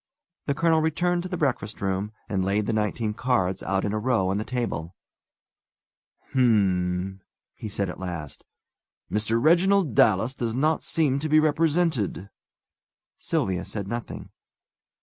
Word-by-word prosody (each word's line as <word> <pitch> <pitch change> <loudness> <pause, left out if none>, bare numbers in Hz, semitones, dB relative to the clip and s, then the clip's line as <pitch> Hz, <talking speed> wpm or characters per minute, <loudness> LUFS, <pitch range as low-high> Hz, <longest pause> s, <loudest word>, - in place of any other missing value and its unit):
The 140 - +1
colonel 165 0 +3
returned 175 +3 +1
to 185 - -6
the 180 - -3
breakfast 125 -8 -1
room, 95 +1 -2 0.2
and 95 -3 -1
laid 100 +2 0
the 115 - -1
nineteen 105 0 -1
cards 105 -6 0
out 95 0 -1
in 105 - -1
a 110 - 0
row 110 -5 +1
on 100 +2 0
the - - -2
table. 105 -9 -3 1.4
"H'm!" 95 -6 +1 0.3
he 110 - -7
said, 100 0 -2
at 90 - -7
last. 85 -6 -6 0.7
"Mr. 110 +2 +1
Reginald 175 - +3
Dallas 110 +4 +3
does 120 -3 -3
not 155 +4 +1
seem 145 -4 +1
to 155 +2 -3
be 155 +1 +6
represented." 155 - +1 0.9
Sylvia 105 - -1
said 100 -3 -5
nothing. 120 +3 -6
110 Hz, 145 wpm, -25 LUFS, 95-150 Hz, 1.4 s, be